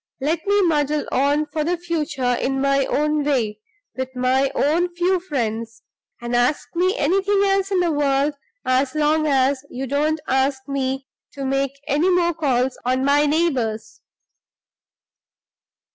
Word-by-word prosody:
Let 315 +6 -2
me 405 0 +3
muddle 300 -3 +1
on 285 +3 +2
for 305 +1 -3
the 350 +3 0
future 315 -7 -1
in 270 +2 -1
my 275 0 +2
own 300 0 0
way, 235 -7 0 0.4
with 260 0 -5
my 260 +2 +2
own 335 +5 +2
few 360 +1 +1
friends; 230 -9 -4 0.4
and 240 0 -3
ask 245 +5 +1
me 370 +6 +1
anything 390 +1 +2
else 390 -1 +1
in 380 -2 +1
the 345 -2 +1
world, 285 0 +1 0.3
as 260 +2 +1
long 305 +1 +2
as 270 -1 +2
you 260 +2 -5
don't 300 +4 0
ask 265 +1 0
me 270 -1 -2 0.3
to 275 -1 -5
make 275 +1 -1
any 300 +5 +2
more 350 -1 +2
calls 265 -5 0
on 255 +2 0
my 290 +1 +3
neighbors." 250 -9 -1
285 Hz, 145 wpm, -21 LUFS, 260-325 Hz, 0.4 s, me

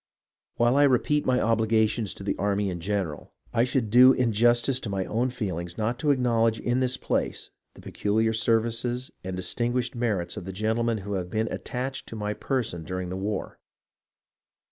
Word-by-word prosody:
While 120 +3 +3
I 145 - +6
repeat 145 +3 +2
my 130 -1 +3
obligations 110 -1 +1
to - - -9
the 100 - -1
army 100 -1 0
in 85 - -5
general, 95 -4 -3 0.2
I 115 0 +3
should 125 -4 -1
do 125 +3 +8
injustice 120 +2 +2
to 115 - -5
my 95 -1 -1
own 120 +4 0
feelings, 90 -8 -4
not 115 +3 -1
to 150 - 0
acknowledge 115 -4 +2
in 120 +1 0
this 130 -1 +1
place - - -2 0.2
the - - -13
peculiar 110 +2 0
services 115 +2 0
and 95 0 -4
distinguished 120 +5 -1
merits 105 -8 -1
of - - -6
the 95 - -6
gentlemen 110 +3 0
who 100 - -3
have 90 -2 -3
been 110 +3 -1
attached 130 +2 -4
to - - -7
my 105 -1 -2
person 115 - -2
during 90 +2 -4
the 90 - -4
war. 100 +1 -4
115 Hz, 175 wpm, -26 LUFS, 100-125 Hz, 0.2 s, do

